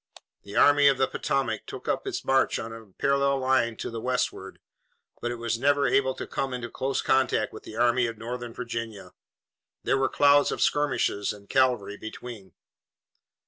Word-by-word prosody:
The 100 0 -11
Army 145 0 +6
of 135 -2 +4
the 130 - +3
Potomac 115 -6 -2
took - - -8
up - - -1
its - - -4
march 135 0 +2
on 115 0 -6
a 115 -1 -11
parallel 140 +7 +1
line 130 -3 +1
to - - -5
the 115 -1 -5
westward, 125 -6 -2 0.6
but 120 - -2
it 120 - -3
was 115 -1 -2
never 140 +2 +3
able 130 -1 +2
to - - -6
come 135 -2 -3
into 120 -1 -6
close 135 +1 -2
contact 130 -5 +1
with - - -9
the 110 - -9
Army 120 +1 +3
of 115 -1 -6
Northern 120 +1 -6
Virginia. 115 -4 -6 0.7
There 135 - +1
were 135 - +2
clouds 145 0 +4
of - - -3
skirmishers 145 -8 +1
and 100 -1 -15
cavalry 125 -6 +1
between. 110 -3 -9
125 Hz, 180 wpm, -26 LUFS, 115-135 Hz, 0.7 s, Army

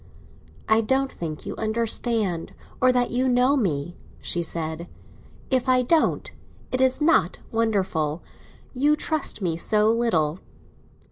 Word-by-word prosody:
"I 220 0 +4
don't 265 +4 0
think 155 -3 -6
you 200 - -5
understand—or 220 0 -1
that 245 -1 +1
you 255 +2 +1
know 250 +3 +3
me," 175 - -1 0.2
she 175 - -1
said. 165 0 -3 0.6
"If 260 0 +1
I 255 0 +4
don't, 315 +6 +1 0.4
it 255 - 0
is 260 +2 +2
not 330 +3 +3
wonderful; 190 -9 -1 0.5
you 290 +4 +3
trust 305 -8 -2
me 165 -3 -1
so 210 +5 +2
little." 180 -9 +1
225 Hz, 125 wpm, -24 LUFS, 175-255 Hz, 0.6 s, I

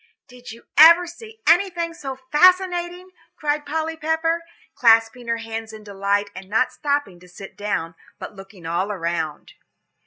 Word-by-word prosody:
"Did 245 -2 -12
you 230 +1 -13 0.2
ever 335 +3 +9
see 440 +6 -12
anything 340 -1 +2
so 270 -5 -7 0.2
fascinating?" 360 +2 +2 0.2
cried 295 -1 -2
Polly 320 +2 -2
Pepper, 320 +2 -1 0.3
clasping 230 +1 +3
her 230 0 0
hands 225 -1 -7
in 215 -1 -11
delight, 200 0 -1
and 190 +1 -10
not 225 +5 +1
stopping 285 -11 -2
to 180 - -17
sit 190 +2 -12
down, 200 -5 -3 0.2
but 210 - -9
looking 195 -2 -13
all 175 +5 -1
around. 165 -5 -4
245 Hz, 150 wpm, -22 LUFS, 200-330 Hz, 0.3 s, ever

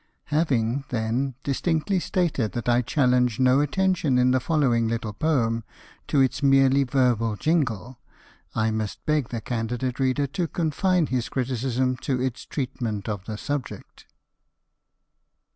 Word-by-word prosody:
Having, 135 -4 +1
then, 120 +3 -1
distinctly 160 +6 0
stated 160 - -1
that 120 -1 -4
I 120 0 +4
challenge 125 -3 +2
no 130 +1 +4
attention 165 -2 +1
in 125 0 +4
the 130 - +3
following 125 -7 +1
little 115 -2 -3
poem 115 -4 0 0.4
to 145 - +2
its 130 0 +1
merely 135 0 +4
verbal 125 -4 +1
jingle, 130 - -1 0.6
I 110 0 +1
must 110 -1 -4
beg 150 -5 +1
the 115 -2 -4
candid 120 +2 -3
reader 135 +2 +1
to 165 +5 -2
confine 170 +2 +1
his 125 -4 -2
criticism 130 0 -1
to 130 0 -2
its 125 -1 -3
treatment 120 -7 -3
of 100 -3 -4
the 110 -1 -5
subject. 145 +2 -6
130 Hz, 135 wpm, -25 LUFS, 115-145 Hz, 0.6 s, I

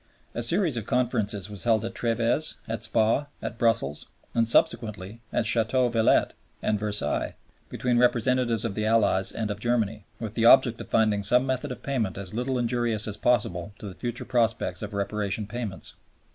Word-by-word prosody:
A 120 - -3
series 165 - +3
of 110 - -5
Conferences 110 -6 0
was 105 -3 -7
held 115 -2 +2
at 115 - -5
TrËves, 120 +6 0
at 110 -1 -4
Spa, 115 +6 +2
at 115 - -6
Brussels, 115 - +1 0.3
and 115 -1 +2
subsequently 110 -2 0
at - - 0
Ch‚teau 115 +2 +2
Villette 115 -1 +3 0.3
and 105 - 0
Versailles, 105 -8 -1 0.3
between 120 -1 0
representatives 120 -1 +2
of 110 - -2
the 110 +1 -1
Allies 100 -4 +3
and 110 -2 -3
of 105 - -5
Germany, 110 -3 -1 0.2
with 110 -2 -5
the 115 0 0
object 120 -2 +6
of - - -10
finding 110 -2 +2
some 125 +5 +3
method 130 +1 -2
of 125 - -8
payment 115 -10 -2
as 100 -1 -6
little 125 +3 -1
injurious 120 -3 -1
as 105 - -3
possible 100 -6 0
to 105 - -8
the 95 - -7
future 120 +5 -5
prospects 115 -7 0
of 105 0 -6
Reparation 100 +1 -2
payments. 110 -3 -5
115 Hz, 175 wpm, -26 LUFS, 105-120 Hz, 0.3 s, object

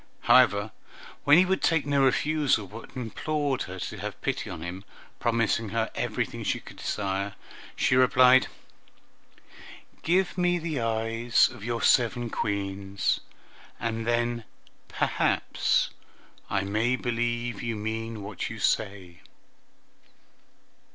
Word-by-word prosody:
However, 100 +2 +4 0.5
when 145 +2 +7
he 185 - +6
would 190 +1 0
take 165 -4 +2
no 140 -1 +2
refusal, 145 -4 +2
but 110 +4 -10
implored 135 +3 -2
her 95 0 -8
to - - -5
have - - -6
pity - - -2
on 80 - -6
him, 90 +3 -6 0.4
promising 115 -1 +1
her 110 +1 -1
everything - - -3
she - - 0
could - - -13
desire, 100 0 -2 0.4
she - - +2
replied, 130 0 +6 1.5
"Give 180 +2 +1
me 175 0 +3
the 160 -4 -3
eyes 115 +1 +2
of 120 -4 -11
your 115 +1 -2
seven 120 -1 +3
Queens, 100 -1 -1 0.6
and 115 -1 -3
then 120 0 0 0.4
perhaps - - +1 0.6
I 100 - +1
may 110 +6 +1
believe 120 -2 -2
you 115 -1 -2
mean 110 0 -4
what 105 +2 -5
you 110 - -7
say." 100 -5 -1
115 Hz, 120 wpm, -27 LUFS, 105-130 Hz, 1.5 s, when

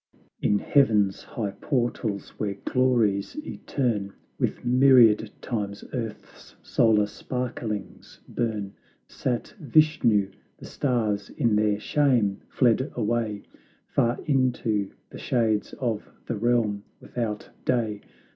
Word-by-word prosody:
In 105 - +3
heaven's 105 -6 +3
high 110 -7 -4
portals, 120 -6 -1
where 100 -2 -1
glories 120 - +1
eterne 105 -8 -2 0.3
With - - -1
myriad 120 -4 +6
times 100 -4 -3
earth's 115 -4 -7
solar 110 -3 +3
sparklings 115 -1 -5
burn, 105 -4 -2 0.3
Sat 120 -3 -3
Vishnu; 140 - +3 0.3
the - - -11
stars 110 -7 -1
in 115 -7 +1
their 105 -1 +2
shame 120 -7 +2
fled 130 +3 +2
away 110 -2 -1 0.5
Far 120 +1 +1
into 125 -7 +1 0.2
the - - -9
shades 110 -4 0
of 115 -5 -3 0.2
the 120 - -2
realm 110 -2 +1 0.2
without 110 -4 -4
day. 110 -4 0
115 Hz, 105 wpm, -26 LUFS, 105-125 Hz, 0.5 s, myriad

